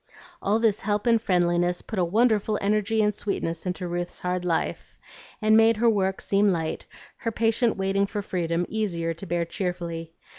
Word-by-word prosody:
All 205 +2 +2
this 225 -3 +2
help 205 +1 -1
and 230 -2 +4
friendliness 175 -3 +1
put 215 - -4
a - - +3
wonderful 215 +2 +2
energy 215 +2 +1
and 210 0 +2
sweetness 190 -4 -3
into 180 0 -3
Ruth's 175 0 -4
hard 180 0 -1
life, 170 -2 -2 0.5
and 215 0 +5
made 225 0 +5
her 230 +1 +4
work 190 -2 0
seem 200 +1 +2
light, 160 -3 -3 0.3
her 230 - -3
patient 225 +1 +1
waiting 195 +1 +1
for 205 0 -4
freedom 175 -2 -1
easier 170 -7 -2
to 170 +4 -10
bear 170 0 0
cheerfully. 170 -3 -4
195 Hz, 175 wpm, -25 LUFS, 175-215 Hz, 0.5 s, and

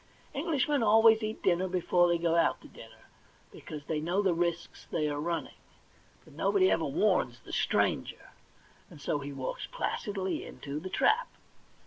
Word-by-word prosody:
Englishmen 290 -2 0
always 225 +1 +6
eat 215 0 -4
dinner 185 -1 +2
before 180 -1 +2
they 170 0 +2
go 165 0 +1
out 165 -1 +2
to - - -13
dinner, - - -15 0.5
because 150 -1 -9
they 155 -2 -2
know 175 +6 0
the 190 -3 +3
risks 170 0 -3
they 155 -2 0
are 145 -1 -2
running; 170 +1 -3 0.7
but - - -17
nobody 375 -2 +2
ever - - +1
warns - - +1
the - - -12
stranger, - - 0 0.6
and 165 -6 -13
so 145 +1 -1
he 140 0 -6
walks 135 -2 -5
placidly 200 - -3
into 145 +1 -7
the 185 +4 -7
trap. 440 - +2
175 Hz, 160 wpm, -30 LUFS, 165-220 Hz, 0.7 s, always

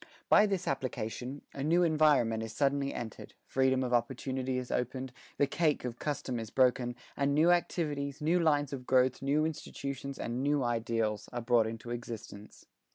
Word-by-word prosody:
By 210 - +7
this 190 -3 -2
application, 130 0 -3
a 140 - -6
new 170 +4 +3
environment 150 -9 +3
is 110 -1 -5
suddenly 140 +2 +1
entered, 110 -3 -7
freedom 130 0 +2
of 125 -1 -2
opportunity 130 +2 -1
is 125 -1 -4
opened, 125 +1 -2 0.2
the 145 - +4
cake 150 -1 0
of 120 -1 -5
custom 130 -4 -2
is 115 -1 -6
broken, 125 -1 +2 0.2
and 140 0 +1
new 160 +4 +5
activities, 145 -5 0
new 165 +4 +2
lines 145 -4 +2
of 125 -2 -6
growth, 130 0 +3
new 145 +3 +2
institutions 140 -3 -5
and 120 +2 -3
new 145 0 +2
ideals, 115 -3 -1
are 120 - -3
brought 115 -1 +3
into 115 +1 -6
existence. 115 -3 -8
130 Hz, 165 wpm, -31 LUFS, 120-145 Hz, 0.2 s, By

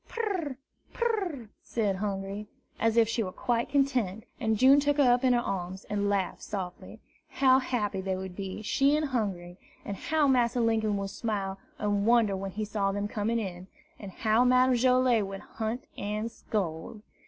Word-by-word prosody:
"Pur! 370 - -2 0.4
pur 475 - -2 0.2
r 340 - -6
r!" 220 - -14
said 205 -5 -1
Hungry, 200 +1 -4 0.3
as 225 0 +2
if 230 -1 +6
she 230 +1 -1
were 185 -4 -3
quite 235 +4 -1
content; 255 -8 +1 0.2
and 220 -1 +1
June 265 +5 +7
took 290 0 +1
her 290 - +5
up 245 +2 0
in 255 -1 +4
her 240 - +3
arms, 190 -2 -4
and 205 -1 0
laughed 195 -2 -1
softly. 185 -4 -6 0.3
How 260 -1 +4
happy 210 -7 -2
they 190 0 -2
would 190 -1 -6
be, 195 +2 -5
she 275 +6 +3
and 305 -1 0
Hungry! 185 -8 -3 0.3
and 200 - -4
how 310 +7 +1
Massa 245 -2 +2
Linkum 220 -3 +1
would 195 0 -3
smile 195 -3 -3 0.2
and 205 0 0
wonder 230 -4 +4
when 195 0 -4
he 215 +3 -4
saw 200 -2 0
them 205 +1 -2
coming 215 +2 -1
in! 185 -4 -5 0.3
and 200 -3 -8
how 220 +4 +2
Madame 255 +1 +4
Joilet 250 -3 +3
would 195 0 -7
hunt 225 +3 -4
and 210 +3 -3
scold! 200 0 -4
215 Hz, 185 wpm, -29 LUFS, 195-250 Hz, 0.4 s, June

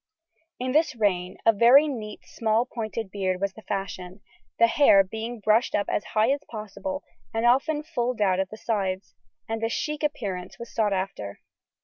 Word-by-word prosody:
In 255 +1 -2
this 305 0 +2
reign 185 -4 0
a 225 - +6
very 245 +8 +7
neat 215 -7 -5
small 225 +1 0
pointed 220 -4 -5
beard 185 -2 -1
was 200 0 -1
the 220 - -12
fashion, 195 -1 -5 0.4
the 230 - +6
hair 230 -5 +6
being 220 +4 -6
brushed 215 +3 +2
up 205 - +1
as - - 0
high 220 +4 +4
as 285 +1 0
possible 235 +7 -5 0.3
and 225 +1 +1
often 295 +5 +3
fulled 250 -7 -2
out 190 -3 +2
at 190 -1 0
the 215 - -9
sides, 195 -4 -2 0.3
and 225 0 -3
a 225 - +1
"chic" 300 +5 -2
appearance 200 -12 -3
was 235 - -9
sought 215 -2 +1
after. 185 - -3
220 Hz, 175 wpm, -26 LUFS, 195-245 Hz, 0.4 s, very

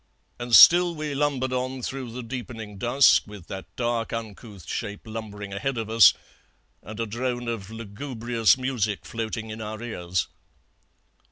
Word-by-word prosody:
And 120 -1 +2
still 175 0 +8
we 150 -1 -4
lumbered 135 -2 0
on 130 0 -3
through 130 -1 -4
the 125 +2 -6
deepening 115 -4 -7
dusk, 125 +4 +4
with 105 -4 -11
that 95 0 -7
dark 120 -1 -1
uncouth 110 -4 -7
shape 105 0 -4
lumbering 105 -3 -7
ahead 125 +6 -2
of 110 -1 -4
us, 115 -5 +7 0.7
and 110 +1 -9
a 115 - 0
drone 120 +2 -3
of 110 -4 -4
lugubrious 115 +1 0
music 120 -6 -2
floating 110 -1 -4
in 110 +1 -7
our 110 0 -6
ears. 90 -7 -3
115 Hz, 150 wpm, -25 LUFS, 105-125 Hz, 0.7 s, still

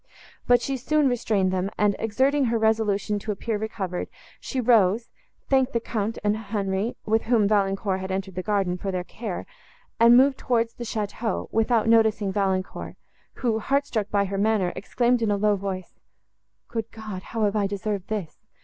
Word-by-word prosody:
But 245 -1 +5
she 270 -1 -1
soon 300 +3 +2
restrained 210 -6 +1
them, 185 +1 0
and, 205 -1 +2
exerting 265 +6 +2
her 230 -1 +1
resolution 220 -2 +1
to 210 - -4
appear 210 +1 -3
recovered, 195 -4 -3 0.3
she 265 - -4
rose, 230 -2 +3 0.4
thanked 265 -1 +2
the 235 - +2
Count 225 -1 -3
and 210 0 +2
Henri, 205 0 -2
with 220 +1 +2
whom 225 -3 +3
Valancourt 195 -1 +1
had 190 0 -5
entered 190 0 -3
the 185 - -3
garden, 195 -3 0
for 195 - -3
their 180 -1 -2
care, 200 +1 -6 0.5
and 235 +1 +8
moved 265 +1 +4
towards 230 -2 0
the 240 - -7
château, 220 +1 -3
without 225 0 +2
noticing 220 -3 +3
Valancourt, 190 -1 -2 0.4
who, 230 -4 -1
heart 275 +5 +1
struck 215 -7 -2
by 200 -1 +2
her 195 0 -3
manner, 205 -4 +1
exclaimed 240 +3 +1
in 225 - +1
a 205 - +2
low 210 0 +3
voice—"Good 200 +3 -8
God! 215 -5 -7
how 225 +3 -3
have 205 0 +1
I 205 -2 +2
deserved 200 -1 -3
this? 205 -7 -4
215 Hz, 175 wpm, -25 LUFS, 195-230 Hz, 0.5 s, and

